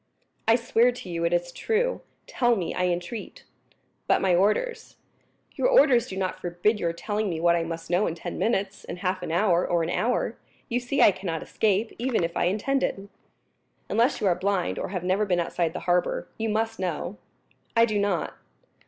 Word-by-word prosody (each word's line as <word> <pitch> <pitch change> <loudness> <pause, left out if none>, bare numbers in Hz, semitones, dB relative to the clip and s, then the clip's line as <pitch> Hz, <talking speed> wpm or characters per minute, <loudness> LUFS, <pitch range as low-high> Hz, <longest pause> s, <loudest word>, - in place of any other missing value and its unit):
"I 225 - +6
swear 235 0 +3
to 245 -6 -9
you 170 0 -1
it 170 - +1
is 175 0 0
true. 465 - 0 0.2
Tell 240 -2 +2
me, 185 -5 -3
I 180 - 0
entreat." 175 +6 -4 0.6
"But - - +4
my 190 -2 +2
orders." 215 - 0 0.6
"Your - - +1
orders 265 - +5
do 190 - -6
not 185 -1 -2
forbid 180 +5 0
your 170 - 0
telling 205 +4 -2
me 165 -3 -3
what 170 +1 +4
I 170 - +1
must 165 0 -5
know 180 +4 +3
in 165 - -3
ten 170 - -6
minutes, 200 -3 -1
in 175 - -7
half 185 0 -2
an - - -4
hour, 175 0 +3
or 170 -1 +1
an 165 - -2
hour. 245 +6 0 0.3
You 245 0 +1
see 255 +3 +1
I - - +8
cannot 180 -4 -4
escape, 215 +1 0
even 240 -6 0
if 165 0 -2
I - - +1
intended." 205 0 -1 0.8
"Unless 235 +3 +2
you - - -1
are 185 - +4
blind, 185 0 -1
or - - -3
have 180 -2 -4
never 185 +3 +1
been 180 -4 +1
outside 170 -1 -1
the - - -6
harbor, 180 0 0
you 225 0 -2
must 225 0 -1
know." 180 +2 -3 0.6
"I 230 - +7
do 215 -3 -1
not." 200 -4 0
195 Hz, 195 wpm, -26 LUFS, 175-225 Hz, 0.8 s, I